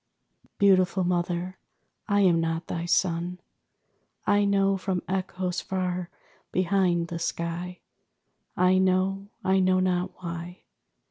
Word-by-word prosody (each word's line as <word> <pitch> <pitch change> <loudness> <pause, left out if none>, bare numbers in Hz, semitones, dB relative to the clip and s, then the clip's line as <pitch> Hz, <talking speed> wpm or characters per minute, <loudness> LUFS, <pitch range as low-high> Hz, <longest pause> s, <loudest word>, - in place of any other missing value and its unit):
Beautiful 190 -2 +4
Mother, 175 +1 -1 0.5
I 205 -1 +3
am 175 -4 +4
not 165 0 -2
thy 170 0 -4
son. 175 0 0 0.9
I 205 0 +3
know 195 -1 +3
from 185 -1 -2
echoes 185 -1 -2
far 180 -1 -2 0.4
behind 180 -2 +1
the 170 - -4
sky. 170 +2 -4 0.8
I 185 +1 +4
know; 190 +1 +1 0.2
I 190 0 +3
know 185 0 +3
not 185 0 0
why. 170 +1 -6
180 Hz, 115 wpm, -26 LUFS, 175-190 Hz, 0.9 s, Beautiful